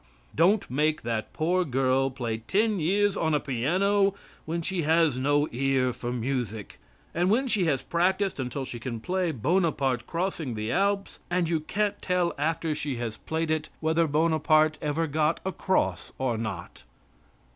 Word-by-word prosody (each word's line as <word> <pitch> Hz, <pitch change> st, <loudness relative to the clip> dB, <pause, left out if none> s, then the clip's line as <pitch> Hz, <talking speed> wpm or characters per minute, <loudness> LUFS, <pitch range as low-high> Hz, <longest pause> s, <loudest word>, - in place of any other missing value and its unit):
Don't 190 Hz, +6 st, +3 dB
make 150 Hz, +4 st, 0 dB
that 115 Hz, -2 st, -2 dB
poor 180 Hz, +3 st, +1 dB
girl 135 Hz, -2 st, +1 dB
play 120 Hz, -4 st, -3 dB
ten 205 Hz, -, +1 dB
years 200 Hz, +5 st, +2 dB
on 160 Hz, -2 st, +1 dB
a -, -, +2 dB
piano 190 Hz, -, +1 dB, 0.3 s
when 170 Hz, +1 st, -2 dB
she 185 Hz, +1 st, -2 dB
has 160 Hz, -2 st, +3 dB
no 145 Hz, +3 st, +2 dB
ear 130 Hz, 0 st, +1 dB
for 120 Hz, +1 st, -5 dB
music, 120 Hz, -4 st, -3 dB, 0.3 s
and 175 Hz, +2 st, +1 dB
when 255 Hz, +6 st, +2 dB
she 205 Hz, -7 st, +1 dB
has 140 Hz, -5 st, 0 dB
practiced 185 Hz, +1 st, 0 dB
until 130 Hz, +1 st, -3 dB
she 120 Hz, -, -7 dB
can 115 Hz, -1 st, -5 dB
play 180 Hz, +6 st, -1 dB
"Bonaparte 135 Hz, -, 0 dB
crossing 170 Hz, -7 st, -2 dB
the 110 Hz, +1 st, -3 dB
Alps," 200 Hz, +1 st, 0 dB
and 175 Hz, -1 st, +1 dB
you 165 Hz, -2 st, +1 dB
can't 205 Hz, +6 st, -2 dB
tell 180 Hz, -2 st, +1 dB
after 160 Hz, +1 st, 0 dB
she 145 Hz, -2 st, -3 dB
has 115 Hz, -2 st, -4 dB
played 160 Hz, 0 st, -2 dB
it 155 Hz, -1 st, -1 dB
whether 160 Hz, +1 st, +2 dB
Bonaparte 155 Hz, 0 st, +3 dB
ever 155 Hz, +2 st, 0 dB
got 155 Hz, +1 st, +1 dB
across 190 Hz, 0 st, 0 dB
or 130 Hz, -3 st, 0 dB
not. 110 Hz, -6 st, -5 dB
155 Hz, 160 wpm, -27 LUFS, 130-180 Hz, 0.3 s, Don't